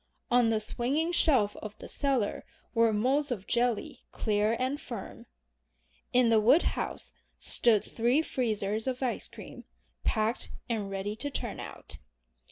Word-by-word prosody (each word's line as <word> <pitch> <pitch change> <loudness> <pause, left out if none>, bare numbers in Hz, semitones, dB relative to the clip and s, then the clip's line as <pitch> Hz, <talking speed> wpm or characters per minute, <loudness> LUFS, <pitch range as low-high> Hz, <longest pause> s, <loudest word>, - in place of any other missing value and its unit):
On 240 -1 +5
the 220 -1 +2
swinging 270 +9 0
shelf 260 -12 +3
of 215 0 -8
the - - -9
cellar 270 -7 0 0.3
were 230 -1 +4
moulds 265 +7 +1
of 210 -6 -3
jelly 240 -2 0
clear 210 +1 +1
and 265 +3 -1
firm. 230 -6 -8 0.8
In 250 -1 +4
the 225 -1 +5
woodhouse 255 +10 +2 0.2
stood 225 -4 +3
three 245 +7 +1
freezers 220 -4 -1
of 260 0 -2
ice 240 -4 -1
cream, - - -11 0.4
"packed" 220 - 0 0.2
and 215 -5 -2
ready 195 +2 -3
to 285 +5 -3
turn - - -4
out. - - -8
235 Hz, 140 wpm, -29 LUFS, 215-260 Hz, 0.8 s, On